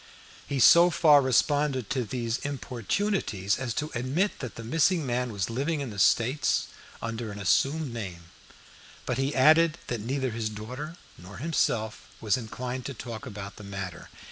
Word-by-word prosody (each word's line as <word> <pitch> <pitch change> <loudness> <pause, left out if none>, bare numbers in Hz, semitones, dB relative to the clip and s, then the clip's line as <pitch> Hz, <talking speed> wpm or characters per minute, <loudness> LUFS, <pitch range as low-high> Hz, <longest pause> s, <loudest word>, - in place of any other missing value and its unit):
He 140 - -2
so 170 +7 +8
far 155 -4 +6
responded 135 -1 +2
to 130 -2 0
these 115 0 -2
importunities 130 - -1
as 130 -3 -3
to 150 +1 -2
admit 135 - 0
that 125 -6 -6
the 115 - -7
missing 165 - +2
man 125 -1 -1
was 100 -4 -2
living 140 +7 -1
in 135 -5 -4
the 100 - -7
States 115 +9 +3 0.4
under 115 -1 -4
an 105 - -8
assumed 135 - +1
name, 95 -7 -6 0.8
but - - -1
he 135 +2 0
added 155 +4 +5
that 120 -3 -2
neither 130 +3 -1
his 110 -1 -2
daughter 125 +10 -7 0.2
nor 90 +2 -11
himself 115 -7 -1
was 110 0 +2
inclined 125 +1 -5
to 140 - -6
talk 115 -1 -7
about 100 -1 -8
the 105 - -10
matter. 95 -3 -7
125 Hz, 165 wpm, -27 LUFS, 110-145 Hz, 0.8 s, so